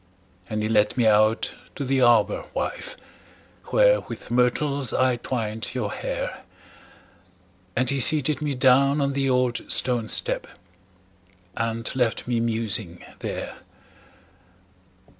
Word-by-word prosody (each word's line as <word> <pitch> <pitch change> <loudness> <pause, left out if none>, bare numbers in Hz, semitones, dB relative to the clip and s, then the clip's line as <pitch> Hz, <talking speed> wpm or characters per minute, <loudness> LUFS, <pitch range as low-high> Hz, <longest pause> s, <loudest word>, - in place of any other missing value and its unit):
And 110 0 -2
he - - 0
led 105 0 +1
me 120 - +2
out 110 +1 +2 0.2
to 140 - -4
the 135 0 +1
arbor, 120 -4 +3
wife, - - -4 0.7
Where - - +3
with - - -10
myrtles 125 +2 +1
I 130 -1 +2
twined 115 -1 -4
your 105 -5 -2
hair; - - -5 1.3
And 130 +2 +1
he 140 +2 -1
seated 150 +2 +4
me 145 -2 -2
down 135 +3 +3
on 140 -1 0
the 135 0 0
old 125 -1 +1
stone 120 -3 +1
step, - - 0 1.1
And 115 0 -2
left 125 -3 0
me 120 -1 0
musing 110 -6 -2
there. - - -6
125 Hz, 120 wpm, -24 LUFS, 110-135 Hz, 1.3 s, seated